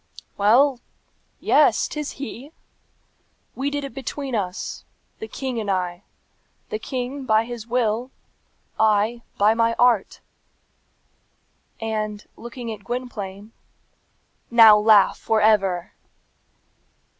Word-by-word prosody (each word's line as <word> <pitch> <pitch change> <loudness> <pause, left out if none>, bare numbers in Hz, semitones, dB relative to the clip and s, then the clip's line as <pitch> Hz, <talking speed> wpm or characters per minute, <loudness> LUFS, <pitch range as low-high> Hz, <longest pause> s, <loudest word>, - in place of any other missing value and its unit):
Well 245 +6 +4 0.6
yes; - - +3
'tis 300 -1 -5
he! 275 +3 -8 1.0
We 270 +2 -2
did 285 0 -3
it 275 - -7
between 270 +1 -5
us 190 -5 -4 0.4
the 220 - -6
king 255 +1 -4
and 210 -2 -4
I: 180 -2 -2 0.7
the 215 - -3
king, 260 +3 -4
by 220 +1 +3
his 235 -2 -8
will; 240 0 0 0.7
I, 220 +2 +2 0.2
by 210 +2 +4
my 230 0 +1
art!" 240 -5 +2 1.6
And 215 -2 -3
looking 235 -1 -7
at 205 -2 -12
Gwynplaine, 210 -3 -6 1.0
"Now 225 -2 +8
laugh 210 -2 +4
for 220 - +1
ever!" 195 -5 +2
225 Hz, 105 wpm, -23 LUFS, 210-250 Hz, 1.6 s, Now